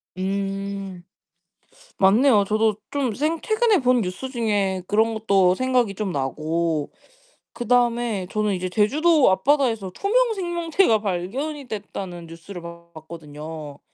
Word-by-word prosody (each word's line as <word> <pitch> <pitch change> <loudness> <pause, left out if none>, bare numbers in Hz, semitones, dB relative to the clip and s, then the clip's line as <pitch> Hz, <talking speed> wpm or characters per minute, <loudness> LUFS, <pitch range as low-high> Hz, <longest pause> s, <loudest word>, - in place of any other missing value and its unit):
음 195 -1 -4 0.9
맞네요. 205 +2 +4
저도 215 0 +1
좀 275 -4 0
생 310 +7 -1
최근에 435 -3 +2
본 250 -2 +3
뉴스 190 +8 -4
중에 205 -6 0
그런 220 +2 +2
것도 195 -4 +3
생각이 250 -3 +1
좀 205 -2 -3
나고 155 +2 -2 0.6
그다음에 240 -4 +1
저는 210 -1 0
이제 185 0 -3
제주도 290 - +3
앞바다에서 225 -2 +1
투명 465 - +1
생명체가 345 - +1
발견이 250 - -3
됐다는 190 -5 -6
뉴스를 170 +3 -10
봤거든요. 160 -3 -10
205 Hz, 265 characters per minute, -23 LUFS, 180-255 Hz, 0.9 s, 맞네요